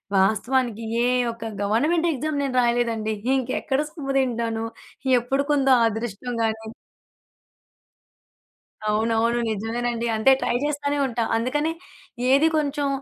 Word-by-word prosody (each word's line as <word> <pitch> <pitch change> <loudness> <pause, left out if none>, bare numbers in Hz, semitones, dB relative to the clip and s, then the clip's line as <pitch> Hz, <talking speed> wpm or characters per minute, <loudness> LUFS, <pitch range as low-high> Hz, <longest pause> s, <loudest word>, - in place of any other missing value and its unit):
వాస్తవానికి 225 +4 +1 0.2
ఏ - - +3 0.3
ఒక్క 230 0 -9 0.2
government 300 +12 +2
exam 305 +3 -3
నేను 270 -2 -2
రాయలేదండి. 235 -2 0 0.2
ఇంకెక్కడ 265 +1 -1
సొమ్ము 275 -5 -5
తింటాను? 230 -3 -1 0.5
ఎప్పుడుంటుందో 270 +2 +2
అదృష్టం 225 +2 -4
గానీ. 220 0 -1 2.2
అవునవును. 225 +2 +1
నిజమేనండి. 235 +2 -2
అంతే 220 +5 +4
ట్రై - - 0
చేస్తూనే 290 -1 -1
ఉంటా. 235 -2 -1
అందుకనే, 290 +7 0 0.6
ఏది 280 +4 +5
కొంచెం 290 -1 0
240 Hz, 100 wpm, -24 LUFS, 225-275 Hz, 2.2 s, ఏది